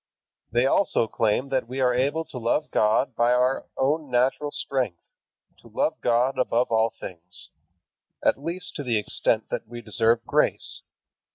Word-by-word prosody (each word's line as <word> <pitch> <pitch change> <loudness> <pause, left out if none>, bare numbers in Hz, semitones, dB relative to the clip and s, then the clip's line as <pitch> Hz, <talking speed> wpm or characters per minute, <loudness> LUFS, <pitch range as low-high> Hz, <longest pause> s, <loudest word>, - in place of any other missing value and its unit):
They 120 +2 +3
also 135 - +2
claim 110 +5 0
that 130 -4 0
we 130 +2 -5
are 125 -1 +3
able 140 +6 0
to 135 -5 -8
love 120 +6 0
God 110 +3 +2
by 120 +1 +3
our 125 +2 +1
own 145 +2 0
natural 130 +4 +1
strength, 125 -14 -2 0.6
to - - -17
love - - -1
God 125 +2 +2
above 125 -1 +1
all 110 0 +3
things, 90 0 -8 0.7
at - - +3
least 170 +2 -3
to 145 - -4
the 120 -4 +1
extent 110 +1 0
that - - -3
we 120 +1 -8
deserve 115 +1 +1
grace. - - 0
125 Hz, 160 wpm, -25 LUFS, 115-135 Hz, 0.7 s, They